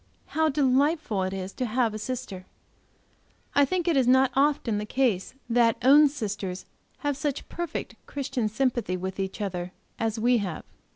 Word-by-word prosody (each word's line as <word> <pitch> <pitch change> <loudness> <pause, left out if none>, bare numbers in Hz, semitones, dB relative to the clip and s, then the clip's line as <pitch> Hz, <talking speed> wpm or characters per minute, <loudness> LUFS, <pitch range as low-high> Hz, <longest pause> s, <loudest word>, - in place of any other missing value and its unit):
How 315 0 +2
delightful 275 - +2
it 185 0 -1
is 190 0 -5
to 255 - -2
have 230 -1 +1
a 215 - -5
sister! 215 -6 -5 1.1
I 285 - +5
think 355 +4 -1
it 335 - +3
is 260 -3 +3
not 260 +1 +5
often 270 -6 +2
the 210 - -3
case 245 -4 0
that 235 -1 +3
own 290 +4 +8
sisters 205 -8 -4 0.4
have 290 -1 0
such 285 0 -3
perfect 345 -1 -4
Christian 260 -5 -2
sympathy 240 -5 0
with 190 +1 -5
each 190 +2 -3
other 180 -2 -3 0.3
as 225 0 -1
we 240 +2 +4
have. 185 -6 -4
245 Hz, 165 wpm, -26 LUFS, 200-275 Hz, 1.1 s, own